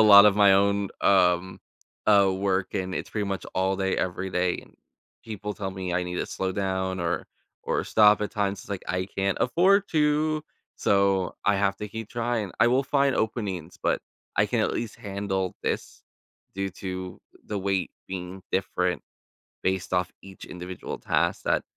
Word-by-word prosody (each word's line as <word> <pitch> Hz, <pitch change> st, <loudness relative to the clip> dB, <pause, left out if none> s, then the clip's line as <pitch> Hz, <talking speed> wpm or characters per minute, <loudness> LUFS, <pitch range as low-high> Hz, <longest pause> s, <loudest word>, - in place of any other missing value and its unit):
lot 100 Hz, -1 st, +10 dB
of 100 Hz, -, +5 dB
my 100 Hz, -2 st, +6 dB
own, 100 Hz, 0 st, +2 dB
um, 95 Hz, -1 st, +3 dB, 0.5 s
uh, 100 Hz, -2 st, +6 dB
work, 95 Hz, -1 st, -1 dB
and 95 Hz, -1 st, -2 dB
it's -, -, -4 dB
pretty 105 Hz, -2 st, -1 dB
much 100 Hz, -1 st, -3 dB
all 95 Hz, +1 st, +1 dB
day, 95 Hz, 0 st, 0 dB
every 90 Hz, +1 st, -2 dB
day, 90 Hz, 0 st, 0 dB
and -, -, -20 dB, 0.5 s
people 105 Hz, -2 st, -5 dB
tell 95 Hz, -3 st, -4 dB
me 95 Hz, -1 st, -4 dB
I 90 Hz, -, +1 dB
need 90 Hz, 0 st, -4 dB
to -, -, -1 dB
"slow 95 Hz, 0 st, -2 dB
down" 95 Hz, -1 st, -1 dB
or 85 Hz, 0 st, -1 dB, 0.4 s
or -, -, -1 dB
"stop" 105 Hz, -1 st, +5 dB
at 105 Hz, -, -2 dB
times. 100 Hz, -2 st, -1 dB
It's -, -, -14 dB
like, 100 Hz, -, -3 dB
"I 90 Hz, +1 st, -1 dB
can't 95 Hz, 0 st, 0 dB
afford 195 Hz, +9 st, +4 dB
to," 155 Hz, 0 st, +2 dB, 0.3 s
so 100 Hz, -2 st, +2 dB
I 100 Hz, -, +5 dB
have 100 Hz, 0 st, +1 dB
to 105 Hz, +1 st, -6 dB
keep 110 Hz, +1 st, -6 dB
trying. 115 Hz, -4 st, -1 dB
I 115 Hz, -, +6 dB
will 130 Hz, +3 st, +3 dB
find 140 Hz, 0 st, +2 dB
openings, 95 Hz, -7 st, -2 dB
but -, -, +1 dB, 0.4 s
I -, -, +5 dB
can, -, -, 0 dB
at -, -, +1 dB
least, 115 Hz, -2 st, -4 dB
handle 95 Hz, -2 st, -3 dB
this -, -, -3 dB, 0.5 s
due 95 Hz, 0 st, -1 dB
to 95 Hz, -1 st, -5 dB, 0.3 s
the 105 Hz, -, -2 dB
weight 95 Hz, -1 st, 0 dB, 0.2 s
being 95 Hz, 0 st, -6 dB
different 90 Hz, -2 st, 0 dB, 0.6 s
based 95 Hz, -1 st, -1 dB
off 90 Hz, 0 st, 0 dB
each 95 Hz, -1 st, -11 dB
individual 90 Hz, 0 st, -7 dB
task -, -, 0 dB
that -, -, +2 dB
95 Hz, 175 wpm, -26 LUFS, 95-105 Hz, 0.6 s, lot